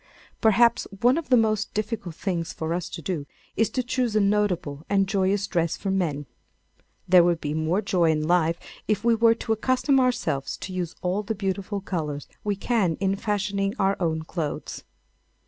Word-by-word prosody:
Perhaps 235 +2 +4
one 245 +2 +5
of 330 -1 -4
the 250 - +6
most 215 -2 +1
difficult 210 -5 -3
things 170 -4 -2
for 160 +1 -3
us 175 0 -3
to 165 -1 -7
do 150 -4 -3 0.3
is 225 - +2
to 255 - -1
choose 250 -2 -1
a - - +5
notable 200 -8 0
and 195 -1 +2
joyous 195 0 +1
dress 170 -4 0
for 195 - -2
men. 160 -7 -1 0.8
There 180 -1 +7
would 170 -1 +2
be 150 -1 -3
more 160 +6 0
joy 175 -4 +2
in 155 -1 +1
life 170 -1 +2 0.3
if 210 -1 0
we 235 0 +4
were 230 0 +4
to 225 -1 -1
accustom 255 +4 +2
ourselves 245 - 0
to 185 - -7
use 180 -3 -3
all 185 +3 0
the 215 +2 -3
beautiful 195 0 -3
colours 150 -7 -4 0.2
we 205 -1 0
can 195 -5 +1
in 195 0 +1
fashioning 200 -1 -1
our 195 0 +2
own 160 -3 -1
clothes. 160 -2 -5
195 Hz, 180 wpm, -25 LUFS, 170-215 Hz, 0.8 s, There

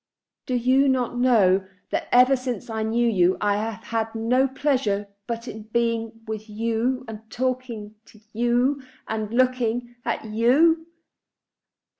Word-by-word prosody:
Do 255 - 0
you 260 +3 +3
not 250 -2 0
know 200 -7 +4 0.2
that - - -1
ever 250 +2 +6
since 250 -1 -5
I 220 0 -2
knew 230 +2 +1
you 185 -5 +3
I 205 -1 +1
have 215 -1 -4
had 225 0 -3
no 250 +4 +2
pleasure 255 -7 0 0.2
but 230 +1 -4
in 220 - -7
being 230 -1 -1
with 215 -1 -6
you, 230 +4 -1
and 220 -1 -7
talking 245 -4 -3
to 215 - -18
you, 240 +4 +1 0.3
and 220 -1 -3
looking 245 -1 +1
at 235 -1 -2
you?" 280 +10 +3
235 Hz, 140 wpm, -24 LUFS, 220-255 Hz, 0.3 s, ever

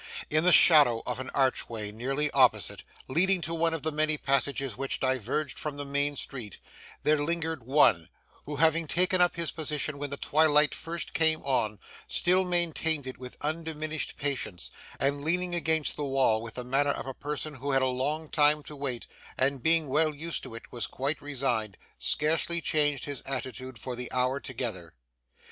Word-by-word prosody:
In 155 +1 +3
the 180 - +5
shadow 145 -10 +7
of 125 0 -3
an 130 0 -5
archway 115 -5 -1
nearly 135 +7 -1
opposite, 130 -2 +2 0.2
leading 180 +7 +2
to 165 +1 -3
one 165 0 +1
of 165 -3 -4
the 160 - 0
many 155 0 +2
passages 135 -3 0
which 135 +2 -3
diverged 130 +2 -1
from 150 -2 -4
the 145 - -5
main 140 +1 0
street, 120 -7 -5 0.5
there 150 -1 +3
lingered 160 -1 -1
one, 120 - +4 0.4
who, 150 - -4
having 160 +2 +2
taken 180 +3 +2
up 175 - +3
his 170 -2 -1
position 150 -2 -2
when 145 0 -3
the 140 - -5
twilight 150 0 +3
first 165 0 -5
came 160 -1 +2
on, 110 -6 0 0.3
still 185 +2 +3
maintained 165 -4 +1
it 130 - -7
with 125 -1 -9
undiminished 155 0 -3
patience, 130 -11 -3 0.3
and 140 +1 0
leaning 180 +3 0
against 160 -3 +2
the 150 - -2
wall 135 -5 +2
with 115 -1 -8
the 125 - -4
manner 135 +3 +1
of - - -2
a 135 - -5
person 150 +2 -4
who 140 +1 -6
had 135 -1 +2
a - - +2
long 145 +5 -2
time 150 0 +3
to 150 - -9
wait, 135 -4 -4 0.3
and 135 0 +1
being 160 +2 +3
well 155 +3 +2
used 165 +3 -1
to 125 -4 -9
it 115 - -10
was 120 - -3
quite 140 +4 -2
resigned, 125 -8 -2 0.2
scarcely 160 +3 +1
changed 145 -5 0
his 145 -3 -5
attitude 130 -1 -5
for 125 +4 -6
the 125 0 -6
hour 130 +2 0
together. 110 - -5
145 Hz, 180 wpm, -28 LUFS, 130-155 Hz, 0.5 s, shadow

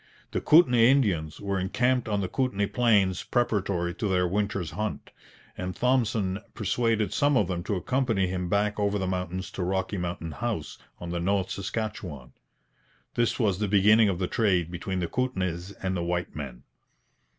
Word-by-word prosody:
The - - -1
Kootenay 125 -8 +6
Indians 90 - +1
were 100 -1 -2
encamped 125 +6 +1
on 100 -1 0
the 95 - -1
Kootenay 105 -3 0
plains 100 -7 +3
preparatory 100 -8 0
to 105 - -2
their 90 -2 +2
winter's 100 -3 -1
hunt, 105 0 -4 0.4
and 90 0 -4
Thompson 115 -6 +1 0.2
persuaded 110 +1 0
some 145 -2 +3
of 105 - +2
them 90 -2 -2
to 100 - -1
accompany 115 -1 0
him 90 -1 -3
back 105 +2 +1
over 100 0 +1
the 95 - -2
mountains 90 0 -3
to 95 - -4
Rocky 95 +2 -1
Mountain 85 -2 -4
House 110 -1 -4 0.2
on 85 -1 -6
the 85 - -2
North 95 +2 0
Saskatchewan. 100 - -5 0.8
This 120 -1 +1
was 100 -5 +1
the 105 - 0
beginning 105 +2 +5
of 95 - -1
the 95 - -1
trade 90 -5 +1
between 90 +1 -3
the 85 - -1
Kootenays 95 -6 -2
and 95 -3 -3
white 85 0 -2
men. 65 -5 -7
100 Hz, 165 wpm, -27 LUFS, 90-110 Hz, 0.8 s, Kootenay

